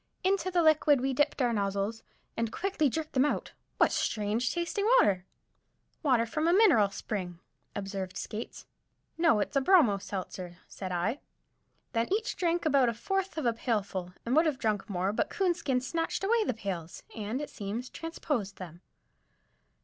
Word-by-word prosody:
Into 375 Hz, -1 st, +1 dB
the 350 Hz, -2 st, +2 dB
liquid 310 Hz, -3 st, +5 dB
we 265 Hz, +1 st, 0 dB
dipped 290 Hz, 0 st, +1 dB
our 240 Hz, -1 st, +2 dB
nozzles, 200 Hz, +1 st, -1 dB, 0.3 s
and 230 Hz, -, 0 dB
as -, -, -17 dB
quickly 345 Hz, -6 st, +1 dB
jerked 310 Hz, +4 st, -4 dB
them 260 Hz, -, +4 dB
out. 295 Hz, -, -1 dB, 0.3 s
What -, -, +4 dB
strange 220 Hz, +3 st, 0 dB
tasting 345 Hz, +5 st, -1 dB
water! 190 Hz, -, +3 dB, 0.7 s
"Water 255 Hz, -7 st, +3 dB
from 305 Hz, +8 st, -1 dB
a 340 Hz, -, +4 dB
mineral 355 Hz, -, +5 dB
spring," 185 Hz, -3 st, -5 dB, 0.4 s
observed 195 Hz, -2 st, -4 dB
Skates. 220 Hz, +2 st, -6 dB, 0.5 s
"No, 330 Hz, -10 st, +4 dB
it's -, -, -3 dB
a 275 Hz, -, +4 dB
bromo 265 Hz, -, +5 dB
seltzer," 185 Hz, -2 st, -6 dB
said 185 Hz, -2 st, -6 dB
I. 190 Hz, +10 st, -1 dB, 0.7 s
Then 230 Hz, +4 st, 0 dB
each 435 Hz, +4 st, 0 dB
drank 345 Hz, -1 st, 0 dB
about 275 Hz, -5 st, +4 dB
a 230 Hz, -, -3 dB
fourth 385 Hz, -, -2 dB
of 310 Hz, -, -2 dB
a 235 Hz, -, +3 dB
pailful, 200 Hz, -6 st, -2 dB
and 240 Hz, +3 st, +1 dB
would 320 Hz, +1 st, +5 dB
have 295 Hz, -4 st, 0 dB
drunk 215 Hz, -3 st, -1 dB
more, 190 Hz, +1 st, 0 dB
but -, -, 0 dB
Coonskin 345 Hz, -9 st, 0 dB
snatched 330 Hz, +7 st, -2 dB
the 435 Hz, -, +2 dB
pails 180 Hz, -6 st, -5 dB
away, 215 Hz, -, -5 dB
and, 220 Hz, +6 st, -2 dB
it 295 Hz, -, -5 dB
seems, 215 Hz, +4 st, -4 dB
transposed 290 Hz, -, -3 dB
them. 175 Hz, -2 st, -10 dB
245 Hz, 170 wpm, -30 LUFS, 200-325 Hz, 0.7 s, liquid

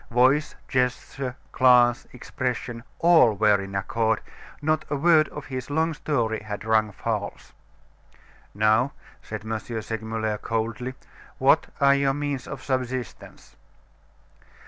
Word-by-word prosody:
Voice, 130 Hz, +5 st, +3 dB
gesture, 130 Hz, 0 st, -1 dB, 0.2 s
glance, 125 Hz, -2 st, +4 dB
expression, 125 Hz, -2 st, -4 dB
all 165 Hz, -10 st, +5 dB
were 105 Hz, -1 st, +3 dB
in 95 Hz, 0 st, -7 dB
accord; 110 Hz, +2 st, 0 dB, 0.4 s
not 155 Hz, +1 st, 0 dB
a 145 Hz, -, 0 dB
word 155 Hz, +1 st, +4 dB
of 145 Hz, -, -8 dB
his 130 Hz, -1 st, -6 dB
long 160 Hz, +3 st, +1 dB
story 120 Hz, -8 st, -1 dB
had 105 Hz, -1 st, -7 dB
rung 110 Hz, -1 st, +2 dB
false. -, -, -4 dB, 1.0 s
"Now," 110 Hz, +5 st, +3 dB, 0.3 s
said -, -, -7 dB
M. 110 Hz, 0 st, -2 dB
Segmuller, 110 Hz, -1 st, -4 dB
coldly, 115 Hz, +3 st, -3 dB, 0.4 s
"what -, -, +4 dB
are 140 Hz, 0 st, +6 dB
your 140 Hz, -1 st, +1 dB
means 145 Hz, -3 st, -3 dB
of -, -, -7 dB
subsistence?" 130 Hz, -2 st, -4 dB
125 Hz, 120 wpm, -25 LUFS, 110-140 Hz, 1.0 s, are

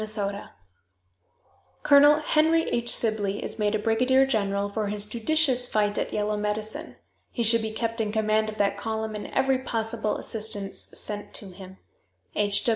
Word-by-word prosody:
_, 205 Hz, -2 st, -2 dB, 1.3 s
"Colonel 290 Hz, +1 st, +6 dB
Henry 320 Hz, +2 st, +2 dB
H. 235 Hz, 0 st, -1 dB
Sibley 210 Hz, -3 st, +1 dB
is -, -, -4 dB
made 210 Hz, 0 st, +1 dB
a -, -, +2 dB
brigadier 250 Hz, +5 st, +2 dB
general 200 Hz, -5 st, -1 dB
for 210 Hz, +1 st, -3 dB
his 205 Hz, 0 st, 0 dB
judicious 250 Hz, +2 st, +1 dB
fight 210 Hz, -2 st, 0 dB
at -, -, -3 dB
Yellow 210 Hz, 0 st, -1 dB
Medicine. 210 Hz, +1 st, -3 dB, 0.3 s
He 235 Hz, -, -3 dB
should 230 Hz, +1 st, +6 dB
be 220 Hz, 0 st, -3 dB
kept 230 Hz, +1 st, -2 dB
in 210 Hz, -1 st, -2 dB
command 215 Hz, 0 st, +1 dB
of 215 Hz, -, -8 dB
that 200 Hz, -1 st, 0 dB
column, 220 Hz, 0 st, -3 dB
and 210 Hz, -, -6 dB
every 265 Hz, -1 st, +1 dB
possible 225 Hz, -3 st, -2 dB
assistance 210 Hz, -3 st, -5 dB
sent 205 Hz, -1 st, -4 dB
to 195 Hz, -3 st, -6 dB
him. 190 Hz, 0 st, -12 dB, 0.6 s
"H. 205 Hz, 0 st, +1 dB
215 Hz, 160 wpm, -25 LUFS, 205-235 Hz, 1.3 s, Colonel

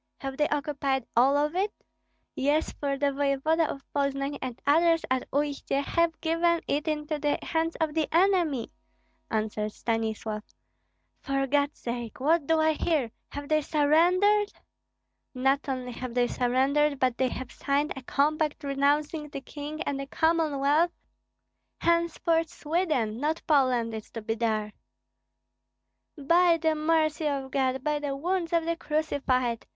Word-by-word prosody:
Have 270 Hz, -1 st, -5 dB
they 295 Hz, +2 st, +2 dB
occupied 280 Hz, -3 st, -1 dB
all 265 Hz, +4 st, +5 dB
of 300 Hz, +3 st, 0 dB
it?" 400 Hz, +3 st, +1 dB, 0.6 s
"Yes, 290 Hz, +4 st, +1 dB
for 280 Hz, -1 st, -2 dB
the 285 Hz, 0 st, +1 dB
voevoda 285 Hz, +4 st, +1 dB
of 275 Hz, -, -6 dB
Poznan 275 Hz, 0 st, -1 dB
and 255 Hz, -2 st, -5 dB
others 330 Hz, +3 st, +4 dB
at 260 Hz, -1 st, 0 dB
Uistsie 285 Hz, -1 st, -1 dB
have 335 Hz, +2 st, 0 dB
given 335 Hz, +1 st, +2 dB
it 295 Hz, +3 st, -1 dB
into 300 Hz, 0 st, -2 dB
the 295 Hz, 0 st, +1 dB
hands 330 Hz, 0 st, -1 dB
of 315 Hz, -2 st, -1 dB
the 315 Hz, -1 st, 0 dB
enemy," 335 Hz, -, +2 dB, 0.6 s
answered 215 Hz, -1 st, -2 dB
Stanislav. 220 Hz, -2 st, -2 dB, 0.8 s
"For 275 Hz, -1 st, -1 dB
God's 285 Hz, +2 st, +1 dB
sake! 235 Hz, -1 st, -5 dB
What 305 Hz, +2 st, +2 dB
do 325 Hz, -1 st, +3 dB
I 315 Hz, 0 st, +4 dB
hear? 300 Hz, -6 st, 0 dB, 0.2 s
Have 285 Hz, 0 st, -7 dB
they 310 Hz, 0 st, +2 dB
surrendered?" 355 Hz, +8 st, +3 dB, 0.8 s
"Not 270 Hz, +2 st, +1 dB
only 255 Hz, -2 st, -3 dB
have 245 Hz, 0 st, -6 dB
they 245 Hz, -1 st, +3 dB
surrendered, 270 Hz, +5 st, +1 dB
but 255 Hz, -2 st, 0 dB
they 260 Hz, -1 st, +2 dB
have 255 Hz, 0 st, -6 dB
signed 285 Hz, +2 st, -1 dB
a 265 Hz, -, -7 dB
compact 300 Hz, +3 st, 0 dB
renouncing 290 Hz, +2 st, 0 dB
the 280 Hz, -, -5 dB
King 300 Hz, +3 st, -6 dB
and 280 Hz, -3 st, -2 dB
the 275 Hz, -, -5 dB
Commonwealth. 315 Hz, 0 st, +2 dB, 0.9 s
Henceforth 335 Hz, -1 st, +1 dB
Sweden, 300 Hz, -9 st, -1 dB
not 310 Hz, +3 st, -1 dB
Poland, 255 Hz, -6 st, +2 dB
is 220 Hz, -1 st, -7 dB
to 225 Hz, -, -6 dB
be 225 Hz, +1 st, -1 dB
there." 215 Hz, -2 st, -1 dB, 1.4 s
"By 335 Hz, +4 st, +4 dB
the 320 Hz, -1 st, +1 dB
mercy 310 Hz, 0 st, +1 dB
of 275 Hz, -2 st, -2 dB
God, 265 Hz, -1 st, 0 dB
by 300 Hz, 0 st, 0 dB
the 285 Hz, -2 st, -3 dB
wounds 345 Hz, +3 st, -1 dB
of 335 Hz, -1 st, +2 dB
the 335 Hz, 0 st, 0 dB
Crucified! 275 Hz, -7 st, -1 dB
290 Hz, 145 wpm, -27 LUFS, 265-320 Hz, 1.4 s, all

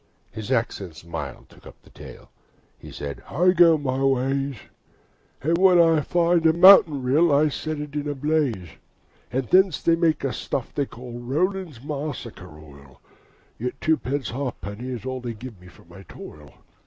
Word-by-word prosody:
is 110 Hz, +3 st, -7 dB
accents 100 Hz, -10 st, -2 dB
mild 80 Hz, -4 st, -7 dB
took -, -, -18 dB
up -, -, -15 dB
the -, -, -20 dB
tale: -, -, -13 dB, 0.5 s
He -, -, -12 dB
said 70 Hz, -1 st, -7 dB
'I 180 Hz, +4 st, +3 dB
go 170 Hz, -3 st, +5 dB
my 135 Hz, -2 st, -2 dB
ways, 135 Hz, +1 st, 0 dB, 0.9 s
And 165 Hz, +4 st, +1 dB
when 185 Hz, -2 st, +5 dB
I 165 Hz, -2 st, +4 dB
find 170 Hz, +2 st, +1 dB
a 160 Hz, -, +4 dB
mountain 170 Hz, -6 st, +7 dB
rill, 150 Hz, +6 st, +3 dB
I 150 Hz, +2 st, +3 dB
set 155 Hz, +2 st, -4 dB
it 145 Hz, -1 st, -7 dB
in 150 Hz, 0 st, -3 dB
a 145 Hz, -, -3 dB
blaze; 135 Hz, -, -1 dB, 0.6 s
And 130 Hz, 0 st, -2 dB
thence 185 Hz, -4 st, +4 dB
they 165 Hz, -, +2 dB
make 165 Hz, -2 st, 0 dB
a 135 Hz, -, -1 dB
stuff 130 Hz, -, -4 dB
they 140 Hz, -2 st, -1 dB
call 120 Hz, 0 st, -10 dB
Rowland's 155 Hz, -, -2 dB
Macassar 145 Hz, -7 st, -6 dB
Oil 70 Hz, -4 st, -16 dB, 0.6 s
Yet 125 Hz, +3 st, -4 dB
twopence 145 Hz, -4 st, -1 dB
halfpenny 125 Hz, -3 st, -5 dB
is 125 Hz, -2 st, -6 dB
all 130 Hz, -1 st, -4 dB
They 120 Hz, -2 st, -5 dB
give 110 Hz, -4 st, -11 dB
me 90 Hz, -, -15 dB
for 90 Hz, -, -18 dB
my 85 Hz, +3 st, -14 dB
toil.' 75 Hz, -5 st, -12 dB
135 Hz, 170 wpm, -23 LUFS, 115-160 Hz, 0.9 s, mountain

